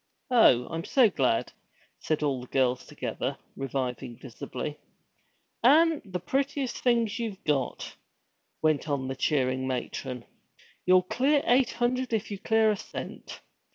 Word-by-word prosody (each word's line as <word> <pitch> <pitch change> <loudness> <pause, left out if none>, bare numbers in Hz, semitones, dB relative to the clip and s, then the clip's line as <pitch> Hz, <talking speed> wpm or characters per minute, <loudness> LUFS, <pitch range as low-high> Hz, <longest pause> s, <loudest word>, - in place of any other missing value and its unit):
'Oh, 125 - +6
I'm 165 0 -4
so 245 -1 +4
glad!' 130 -8 +1 0.5
said 155 -1 -1
all 135 -4 0
the 125 - -10
girls 130 -1 +1
together, - - -4 0.2
reviving 130 -3 -4
visibly. 145 +4 -6 0.8
'An' 315 +5 +5
the 185 -4 -5
pretty 275 - -1
things 235 -2 0
you 225 -4 -3
got!' 140 -4 -1 0.7
went 155 -1 +2
on 135 -2 -1
the 135 - -3
cheering 130 -2 0
matron. 125 -1 -4 0.6
'You'll 185 0 +6
clear 275 +9 +2
eight 250 0 +3
hundred 245 +1 -1
if 215 -1 -1
you'll 200 - -4
clear 220 +1 +3
a 210 - -1
cent. - - -8
180 Hz, 135 wpm, -28 LUFS, -, 0.8 s, Oh